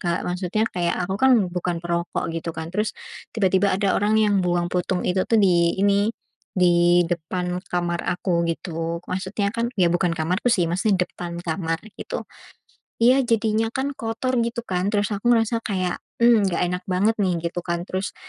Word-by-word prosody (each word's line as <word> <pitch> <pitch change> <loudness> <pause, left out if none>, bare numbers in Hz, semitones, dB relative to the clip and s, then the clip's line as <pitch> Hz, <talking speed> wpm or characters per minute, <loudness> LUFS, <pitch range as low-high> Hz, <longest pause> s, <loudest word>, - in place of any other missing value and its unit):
Kak. 170 -1 -1
Maksudnya 180 +4 -1
kayak, 175 -1 0
aku 190 - -2
kan 265 -1 +6 0.2
bukan 175 -1 -2
perokok 170 -1 -2
gitu 165 0 -4
kan, 160 +1 -6
terus 210 +2 -1 0.4
tiba-tiba 195 -2 +2
ada 200 -1 +1
orang 210 +2 +1
yang 210 -2 +3
buang 175 -1 0
puntung 180 0 0
itu, 185 +1 +1
tuh, 230 - +3
di 170 -3 +3
ini, 200 +1 +3 0.5
di 175 -1 +4
depan 180 +2 -2
kamar 175 -1 -1
aku, 175 -2 0
gitu. 165 0 -3
Maksudnya 190 +2 -2
kan 230 0 -1
ya, 180 -3 +3
bukan 175 -1 +1
kamarku 180 +9 0
sih, 185 -7 +3
maksudnya 185 +1 +2
depan 170 -1 -6
kamar 165 -1 -2 0.2
gitu - - -4 0.8
iya 255 +3 +6
jadinya 225 -1 +1
kan 270 +2 -1
kotor 235 +3 -2
gitu, 235 0 -1
kan. 185 -4 -2
Terus 205 +1 +1
aku 205 +2 -4
ngerasa 230 -1 +3
kayak, 185 -4 -1 0.2
"Mmm, 230 -4 +5
enggak 180 -2 0
enak 180 +1 -1
banget, 195 +4 +2
nih." 185 -4 +1 0.2
Gitu, 175 - -4
kan. 170 0 -1
Terus, 185 +2 -4
185 Hz, 175 wpm, -23 LUFS, 175-210 Hz, 0.8 s, kan